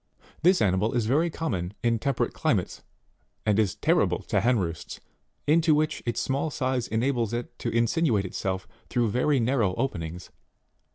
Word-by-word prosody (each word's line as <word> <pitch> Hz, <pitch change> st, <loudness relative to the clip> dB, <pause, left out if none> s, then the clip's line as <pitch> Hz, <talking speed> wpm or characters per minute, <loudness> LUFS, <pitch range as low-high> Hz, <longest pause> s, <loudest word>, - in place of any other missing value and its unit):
This 180 Hz, +1 st, +4 dB
animal 100 Hz, +3 st, +1 dB
is 120 Hz, -3 st, +1 dB
very 150 Hz, +9 st, +2 dB
common 105 Hz, -, -3 dB
in 115 Hz, -1 st, +2 dB
temperate 140 Hz, +1 st, -1 dB
climates, -, -, -1 dB, 0.6 s
and 105 Hz, -1 st, +3 dB
is 105 Hz, -5 st, +1 dB
terrible -, -, +1 dB
to -, -, 0 dB
hen 120 Hz, +1 st, +3 dB
roosts, 85 Hz, -5 st, -4 dB, 0.5 s
into 160 Hz, +1 st, +4 dB
which 155 Hz, +1 st, 0 dB
its 120 Hz, -, 0 dB
small 140 Hz, +4 st, -1 dB
size 130 Hz, -4 st, -1 dB
enables 120 Hz, -1 st, 0 dB
it 120 Hz, +1 st, -4 dB
to 120 Hz, -, -2 dB
in 115 Hz, 0 st, +2 dB
sinuate 115 Hz, -, +1 dB
itself 95 Hz, 0 st, -3 dB, 0.2 s
through 120 Hz, -4 st, +1 dB
very 135 Hz, +4 st, +2 dB
narrow 115 Hz, -6 st, +1 dB
openings. 90 Hz, -9 st, -4 dB
120 Hz, 160 wpm, -26 LUFS, 105-140 Hz, 0.6 s, This